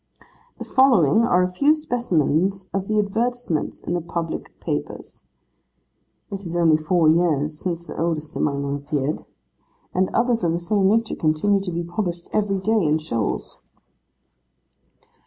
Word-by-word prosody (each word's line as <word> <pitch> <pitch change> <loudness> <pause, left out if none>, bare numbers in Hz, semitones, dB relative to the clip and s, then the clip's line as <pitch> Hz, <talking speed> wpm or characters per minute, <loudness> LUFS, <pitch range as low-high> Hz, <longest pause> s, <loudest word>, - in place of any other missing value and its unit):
The - - -7
following 225 - +4
are 230 -6 +3
a - - +2
few 280 +12 +3
specimens 190 - 0
of 195 0 -2
the 215 - 0
advertisements 220 -4 -1
in - - -3
the 175 - 0
public 165 0 -5
papers. - - -5 1.1
It 195 -1 -5
is 175 -3 -4
only 165 -2 +4
four 160 +1 +2
years 155 -2 +2
since 170 -2 -3
the - - -8
oldest 160 -2 -2
among 140 -1 0
them 140 0 -2
appeared; 145 0 -2 0.7
and 185 +1 +1
others 235 -3 +1
of 165 -1 +2
the - - 0
same 190 +3 +1
nature 225 +2 +1
continue 160 +6 +2
to 190 -2 -4
be 170 0 -2
published 175 0 -4
every 205 -2 +1
day, 215 +2 +1
in 155 0 +2
shoals. 115 -9 -3
175 Hz, 150 wpm, -22 LUFS, 155-205 Hz, 1.1 s, following